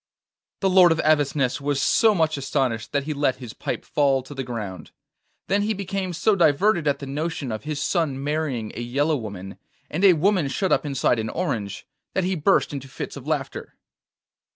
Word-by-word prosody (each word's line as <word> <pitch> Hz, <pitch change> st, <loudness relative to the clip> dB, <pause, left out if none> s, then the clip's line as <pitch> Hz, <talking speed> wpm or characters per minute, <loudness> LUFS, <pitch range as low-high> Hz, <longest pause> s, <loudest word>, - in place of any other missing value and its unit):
The 195 Hz, -, +3 dB
Lord 180 Hz, -2 st, +7 dB
of 160 Hz, -, +1 dB
Avesnes 145 Hz, -3 st, +1 dB
was 140 Hz, 0 st, 0 dB
so 220 Hz, +9 st, +4 dB
much 160 Hz, -3 st, +2 dB
astonished 130 Hz, -5 st, -1 dB
that 140 Hz, -1 st, 0 dB
he 155 Hz, +2 st, -3 dB
let 140 Hz, -3 st, +1 dB
his 125 Hz, -4 st, -9 dB
pipe -, -, -4 dB
fall 135 Hz, -3 st, +2 dB
to 130 Hz, -, -10 dB
the 135 Hz, -1 st, -4 dB
ground; 110 Hz, -7 st, -6 dB, 0.6 s
then 200 Hz, +1 st, +1 dB
he 215 Hz, +1 st, 0 dB
became 195 Hz, -1 st, -3 dB
so 200 Hz, +5 st, +2 dB
diverted 170 Hz, +1 st, +3 dB
at 140 Hz, -1 st, +2 dB
the 140 Hz, -, -7 dB
notion 145 Hz, -1 st, -3 dB
of 110 Hz, +5 st, -5 dB
his 150 Hz, -2 st, -3 dB
son 140 Hz, -4 st, 0 dB
marrying 145 Hz, -7 st, -2 dB
a -, -, -6 dB
yellow 140 Hz, +6 st, +1 dB
woman, 100 Hz, -6 st, -7 dB, 0.3 s
and 170 Hz, +6 st, -2 dB
a 195 Hz, -2 st, +8 dB
woman 180 Hz, -1 st, +2 dB
shut 185 Hz, +8 st, -1 dB
up -, -, +2 dB
inside 135 Hz, -4 st, +1 dB
an 110 Hz, 0 st, -2 dB
orange, 105 Hz, -, -3 dB, 0.3 s
that 190 Hz, -, +1 dB
he 185 Hz, +2 st, 0 dB
burst 175 Hz, -1 st, +2 dB
into 135 Hz, -1 st, -6 dB
fits 130 Hz, -, -6 dB
of -, -, -10 dB
laughter. -, -, -3 dB
145 Hz, 195 wpm, -24 LUFS, 130-175 Hz, 0.6 s, a